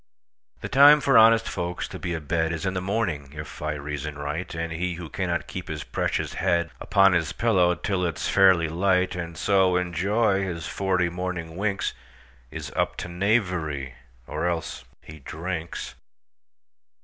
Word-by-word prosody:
The -, -, -4 dB
time 145 Hz, +2 st, +7 dB
for 135 Hz, -2 st, +2 dB
honest 115 Hz, 0 st, +6 dB
folks 90 Hz, -1 st, -3 dB
to -, -, -8 dB
be 85 Hz, -, -3 dB
a -, -, -3 dB
bedIs 80 Hz, +2 st, -1 dB
in 95 Hz, -, 0 dB
the 90 Hz, -, -2 dB
morning, 90 Hz, -9 st, -2 dB
if 75 Hz, 0 st, -8 dB
I 75 Hz, 0 st, -1 dB
reason 75 Hz, 0 st, -5 dB
right; 75 Hz, +5 st, -4 dB
And 80 Hz, 0 st, -3 dB
he 90 Hz, +2 st, -2 dB
who 85 Hz, -2 st, -8 dB
cannot 85 Hz, +1 st, -2 dB
keep 95 Hz, -1 st, -7 dB
his 75 Hz, -3 st, -5 dB
precious -, -, -2 dB
headUpon 90 Hz, +3 st, +2 dB
his 85 Hz, -2 st, 0 dB
pillow 90 Hz, -7 st, +3 dB
till 90 Hz, +1 st, -2 dB
it 85 Hz, -3 st, -2 dB
's -, -, -2 dB
fairly 95 Hz, -4 st, +5 dB
light, 90 Hz, +2 st, +1 dB
And 85 Hz, -2 st, -6 dB
so 95 Hz, -1 st, +3 dB
enjoy 95 Hz, +4 st, +1 dB
his 85 Hz, -4 st, -4 dB
forty 90 Hz, -3 st, 0 dB
morning 85 Hz, -2 st, -4 dB
winks, 100 Hz, -1 st, -1 dB, 0.6 s
Is -, -, -7 dB
up -, -, 0 dB
to 90 Hz, -, -5 dB
knavery; 90 Hz, -, 0 dB, 0.3 s
or 80 Hz, +3 st, -2 dB
else—he 80 Hz, -2 st, -6 dB
drinks! 80 Hz, +3 st, -5 dB
90 Hz, 160 wpm, -25 LUFS, 80-95 Hz, 0.6 s, time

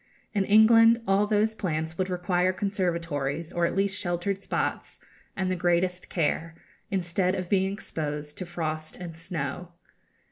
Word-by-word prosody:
In 200 Hz, -3 st, +1 dB
England 225 Hz, +2 st, +7 dB
all 195 Hz, +2 st, +3 dB
those 215 Hz, +1 st, +2 dB
plants 160 Hz, -5 st, -2 dB
would 185 Hz, +2 st, -1 dB
require 180 Hz, 0 st, +1 dB
conservatories, 170 Hz, -6 st, -2 dB
or 170 Hz, 0 st, +2 dB
at -, -, -4 dB
least 195 Hz, 0 st, +1 dB
sheltered 190 Hz, 0 st, -2 dB
spots, -, -, -2 dB, 0.4 s
and 185 Hz, -1 st, 0 dB
the -, -, +1 dB
greatest 180 Hz, +1 st, 0 dB
care, 165 Hz, 0 st, -1 dB, 0.3 s
instead 185 Hz, 0 st, 0 dB
of 185 Hz, -2 st, -4 dB
being 190 Hz, -1 st, +2 dB
exposed 150 Hz, -6 st, -5 dB
to 185 Hz, -, -5 dB
frost 155 Hz, -2 st, -4 dB
and 170 Hz, -3 st, -7 dB
snow. 165 Hz, 0 st, -5 dB
180 Hz, 145 wpm, -27 LUFS, 165-195 Hz, 0.4 s, England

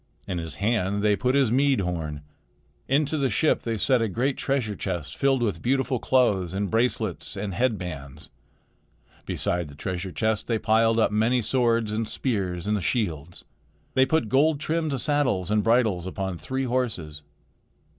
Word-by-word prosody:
In 90 Hz, -, -2 dB
his 80 Hz, -4 st, -5 dB
hand 100 Hz, -, 0 dB
they 105 Hz, -1 st, +4 dB
put 125 Hz, +5 st, 0 dB
his 135 Hz, -5 st, +3 dB
mead 135 Hz, -2 st, +3 dB
horn. 80 Hz, -5 st, -4 dB, 0.6 s
Into 150 Hz, +3 st, +1 dB
the 135 Hz, -2 st, +1 dB
ship 150 Hz, +8 st, +2 dB
they 115 Hz, -1 st, -2 dB
set 125 Hz, +4 st, +2 dB
a 115 Hz, -, +1 dB
great 125 Hz, +7 st, 0 dB
treasure 130 Hz, -6 st, -1 dB
chest 85 Hz, -8 st, -4 dB
filled 135 Hz, -2 st, +2 dB
with 100 Hz, -8 st, -1 dB
beautiful 130 Hz, 0 st, 0 dB
clothes 100 Hz, -10 st, +2 dB
and 100 Hz, 0 st, -2 dB
bracelets 110 Hz, -5 st, -1 dB
and 100 Hz, -1 st, -3 dB
head 120 Hz, +1 st, +1 dB
bands. 75 Hz, -6 st, -8 dB, 1.0 s
Beside 85 Hz, -2 st, -1 dB
the 70 Hz, -, -12 dB
treasure 95 Hz, +4 st, -4 dB
chest 110 Hz, +2 st, -1 dB
they 115 Hz, -, +1 dB
piled 115 Hz, +1 st, +3 dB
up 115 Hz, -, +3 dB
many 115 Hz, +3 st, +2 dB
swords 115 Hz, -2 st, +1 dB
and 110 Hz, +1 st, -2 dB
spears 95 Hz, -8 st, -2 dB
and 105 Hz, -1 st, 0 dB
shields. 90 Hz, -, -2 dB, 0.5 s
They 130 Hz, 0 st, +4 dB
put 160 Hz, -8 st, +1 dB
gold 145 Hz, +6 st, +3 dB
trimmed 155 Hz, -3 st, -1 dB
saddles 125 Hz, -, 0 dB
and 105 Hz, 0 st, +3 dB
bridles 110 Hz, -7 st, +2 dB
upon 95 Hz, 0 st, -3 dB
three 130 Hz, +9 st, -3 dB
horses. 110 Hz, -, -2 dB
110 Hz, 165 wpm, -25 LUFS, 95-130 Hz, 1.0 s, they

